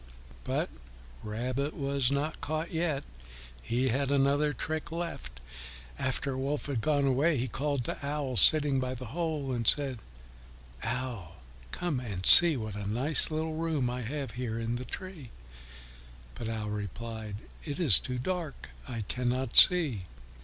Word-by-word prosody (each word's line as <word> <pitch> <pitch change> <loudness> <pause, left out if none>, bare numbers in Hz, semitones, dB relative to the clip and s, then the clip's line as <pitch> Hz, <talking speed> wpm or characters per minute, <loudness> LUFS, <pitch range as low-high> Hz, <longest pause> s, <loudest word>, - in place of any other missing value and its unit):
But - - -2 0.5
Rabbit 125 +7 -3
was 140 -2 -1
not 140 +3 -2
caught 155 +2 -3
yet; 160 -4 -1 0.6
he 125 - -1
had 135 +3 0
another 140 +2 +2
trick 155 +4 -4
left. 160 - -6 0.6
After 130 +1 -2
Wolf 140 +3 -3
had 135 -6 -2
gone 145 +1 +1
away, 140 +4 +2
he 125 +2 -1
called 140 +1 -2
to - - -5
Owl 140 -2 -3
sitting 145 -1 +4
by 130 0 -3
the 130 +1 -8
hole, 155 -5 -2
and 120 -3 -2
said, 135 -5 +3 0.8
"Owl, 115 -8 -4 0.3
come 170 - -2
and 100 -7 -6
see 170 -4 +9
what 110 -3 -5
a 100 -1 -4
nice 135 +8 +7
little 160 0 -3
room 155 -6 -1
I 125 +1 -4
have 135 +1 -5
here 120 -2 -4
in 115 +1 -2
the 125 - -7
tree." 185 -9 -8 1.0
But 115 - -6
Owl 110 -2 -4
replied, 105 +1 -6 0.3
"It 145 0 -5
is 145 - +7
too 125 -1 -5
dark, 165 +2 -5 0.2
I 120 -4 -5
cannot 125 +3 -2
see." 150 - +6
135 Hz, 150 wpm, -29 LUFS, 120-150 Hz, 1.0 s, see